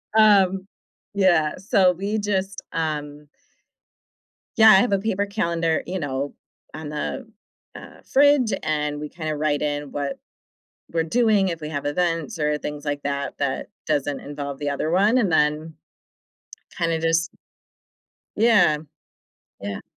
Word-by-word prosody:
Um, 195 -3 +4 0.5
yeah, 175 -6 +3
so 190 -1 +3
we 200 +5 -2
just, 195 -2 -2
um 150 -2 -4 1.3
Yeah, 220 -1 +8
I 215 - +9
have 200 +5 +3
a 195 - +2
paper 200 -1 -1
calendar, 170 -6 -1
you 185 +1 -3
know, 140 -1 -3 0.4
on 155 -1 -7
the, 220 - -4 0.5
uh, - - -12
fridge, 280 -4 +4
and 150 -1 -1
we 150 0 -6
kinda 155 -3 -4
write 150 -1 0
in 145 -1 -3
what 140 -1 -4 0.7
we're 165 -1 +1
doing 210 0 +2
if 165 -1 -5
we 150 - -5
have 145 -2 -4
events 165 0 -1
or 150 0 +1
things 150 0 -6
like 145 -1 -3
that 140 0 -3
that 140 -2 -2 0.2
doesn't 145 -2 -1
involve 140 -1 -6
the 145 - -2
other 140 +2 -2
one, 205 +7 +3
and 205 -9 +2
then 155 +1 +1 1.0
kinda 165 -1 0
just 165 0 +1 1.1
Yeah. 205 -9 +4 0.8
Yeah. 100 0 -5
160 Hz, 140 wpm, -23 LUFS, 150-195 Hz, 1.3 s, I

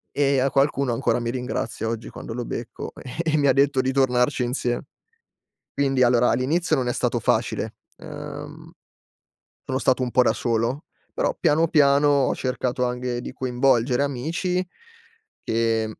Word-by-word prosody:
e 140 -2 +2
a 135 +2 +1
qualcuno 140 -2 +1
ancora 120 +1 0
mi 115 0 -2
ringrazia 125 -3 -3
oggi, 115 0 -4
quando 115 - -8
lo 120 0 -3
becco, 115 - -6
e 130 - -9 0.2
e 155 - +3
mi 140 -2 +4
detto 140 -1 +3
di 130 +1 0
tornarci 125 -1 +2
insiem 120 -1 -1 0.9
quindi, 135 -2 +1
allora, 120 0 +4
all'inizio 160 +6 +1
non 130 -4 0
è - - +1
stato - - 0
facile, - - 0 0.2
ehm, - - -9 0.9
sono 130 0 -2
stato 130 -1 +2
un 125 - -3
po' 125 - +4
da 125 - +3
solo, 120 +4 -1 0.3
però - - 0
piano, 160 +3 +3
piano 145 -2 +4 0.2
ho - - +1
cercato 125 0 -2
anche 125 0 -3
di - - -7
coinvolgere 125 0 +1
amici 165 +7 -1 0.8
che 115 -1 +1
130 Hz, 155 wpm, -23 LUFS, 120-140 Hz, 0.9 s, mi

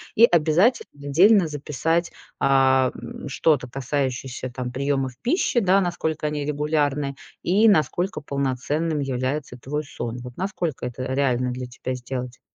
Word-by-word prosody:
И 230 - +8
обязательно 175 +6 +3 0.2
отдельно 190 +4 +6
записать, 155 +3 -1 0.3
а, 130 -1 +4
м, - - -8
что-то 140 -2 +2
касающееся, 130 -1 -3
там, 125 0 -5
приёмов 135 0 -1
пищи, 255 -3 +2
да, 195 -1 +4
насколько 160 -3 -2
они 150 -1 -2
регулярны 145 -1 0 0.3
и 210 +5 +4
насколько 190 +1 +1
полноценным 145 +3 -1
является 130 +1 -2
твой 150 +5 -4
сон. 120 -5 -5
Вот 125 -1 -9
насколько 180 -6 -3
это 125 +1 -6
реально 125 -2 +1
для 125 0 -5
тебя 125 +1 -5
сделать? 125 0 -5
145 Hz, 135 wpm, -24 LUFS, 130-165 Hz, 0.3 s, И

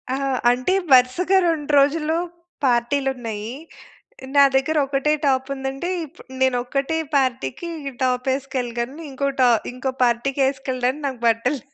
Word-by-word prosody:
ఆ! - - -2 0.3
అంటే 250 +8 +1 0.2
వరుసగా 260 +10 +5
2 300 -3 -2
రోజులు 300 +3 +2 0.5
పార్టీలు 255 +3 +1
ఉన్నయి. 225 -3 -5 0.8
నా 280 - +8
దగ్గర 270 +4 +1
ఒకటే 275 +2 +1
టాప్ 265 -1 +1
ఉందంటే, 270 +5 -4 0.2
ఇప్పుడు 285 - -17
నేను 260 -1 +3
ఒక్కటే 275 +5 -1 0.2
పార్టీ‌కి 255 - -1 0.2
ఈ - - -10
టాప్ 255 0 0
ఎసుకెళ్ళగలను. 255 +1 -4
ఇంకో 280 +1 -2
టా 250 - +6 0.2
ఇంకో 255 +1 -3
పార్టీ‌కి 245 +4 0
ఎసుకెళ్ళడానికి 265 +1 -2
నాకు 260 -3 -5
బట్టలు 230 +5 +1
265 Hz, 135 wpm, -22 LUFS, 250-280 Hz, 0.8 s, నా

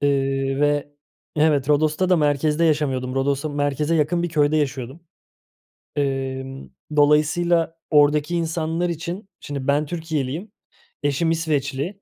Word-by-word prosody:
Eee, 135 -1 0
ve 145 0 +1 0.4
Evet, 150 -3 +2
Rodos'ta 155 +4 +2
da 180 - +4
merkezde 150 +1 +2
yaşamıyordum. 135 -5 0
Rodos'ta 140 +2 0
merkeze 145 +2 0
yakın 165 +2 +1
bir 175 - -1
köyde 155 -1 +2
yaşıyordum. 135 0 -2 1.0
Emm, 135 -1 -3 0.3
dolayısıyla 160 +3 +3
oradaki 150 +2 +3
insanlar 165 +1 -1
için 170 +4 -5
Şimdi 140 -2 -6
ben 145 +2 +2
Türkiyeliyim, 160 +2 -3 0.5
eşim 145 +3 +1
İsveçli, 155 +3 -2
150 Hz, 115 wpm, -22 LUFS, 140-165 Hz, 1.0 s, da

